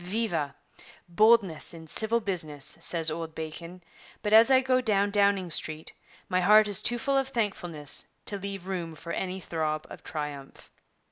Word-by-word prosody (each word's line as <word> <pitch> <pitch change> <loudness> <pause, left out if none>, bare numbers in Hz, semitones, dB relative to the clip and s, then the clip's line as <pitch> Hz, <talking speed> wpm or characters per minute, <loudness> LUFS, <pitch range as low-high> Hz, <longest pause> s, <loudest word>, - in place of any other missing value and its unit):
Viva! 180 -7 -1 0.5
"Boldness 195 -3 +3
in 165 -1 -10
civil 220 +8 0
business," 165 -9 -4
says 165 -1 0
old 160 0 -5
Bacon, 170 +3 -7 0.4
but 210 0 0
as 225 +2 +8
I 260 -1 +7
go 255 -1 +2
down 205 -4 +2
Downing 200 -3 +2
Street 155 0 -2 0.4
my 185 0 +1
heart 210 +3 +6
is 205 -2 -2
too 240 - +1
full 275 +3 +1
of 270 - -1
thankfulness 180 - -4 0.2
to 200 - -3
leave 195 -2 -6
room 175 -4 -4
for 170 +2 -8
any 190 0 -3
throb 155 -3 -2
of - - -9
triumph.' 145 -3 -6
185 Hz, 160 wpm, -28 LUFS, 160-215 Hz, 0.5 s, as